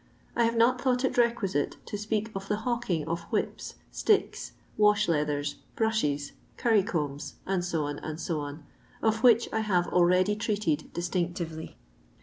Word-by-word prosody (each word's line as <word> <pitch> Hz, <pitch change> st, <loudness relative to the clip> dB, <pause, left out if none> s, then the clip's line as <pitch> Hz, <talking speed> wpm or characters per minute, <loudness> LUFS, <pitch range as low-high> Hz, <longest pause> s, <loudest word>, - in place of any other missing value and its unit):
I 235 Hz, -, +3 dB
have 230 Hz, 0 st, 0 dB
not 245 Hz, +2 st, +4 dB
thought 255 Hz, -1 st, +2 dB
it -, -, 0 dB
requisite 230 Hz, -10 st, +1 dB
to -, -, -5 dB
speak 215 Hz, +1 st, -2 dB
of 195 Hz, 0 st, -5 dB
the 210 Hz, -, +1 dB
hawking 230 Hz, -11 st, -1 dB
of 170 Hz, +1 st, -2 dB
whips, -, -, -2 dB, 0.2 s
sticks, 425 Hz, -2 st, +1 dB, 0.2 s
wash 210 Hz, 0 st, +4 dB
leathers, 150 Hz, -3 st, 0 dB, 0.2 s
brushes, 150 Hz, -11 st, 0 dB, 0.3 s
curry 225 Hz, -5 st, +4 dB
combs, 150 Hz, -8 st, -3 dB
&c., 180 Hz, -3 st, 0 dB
Ac, 155 Hz, +3 st, -3 dB, 0.7 s
of 220 Hz, 0 st, +2 dB
which 235 Hz, -2 st, +6 dB
I 220 Hz, -, +1 dB
have 185 Hz, -5 st, +1 dB
already 180 Hz, +3 st, +4 dB
treated 205 Hz, -8 st, -1 dB
distinctively. 170 Hz, -2 st, -3 dB
195 Hz, 135 wpm, -28 LUFS, 165-225 Hz, 0.7 s, which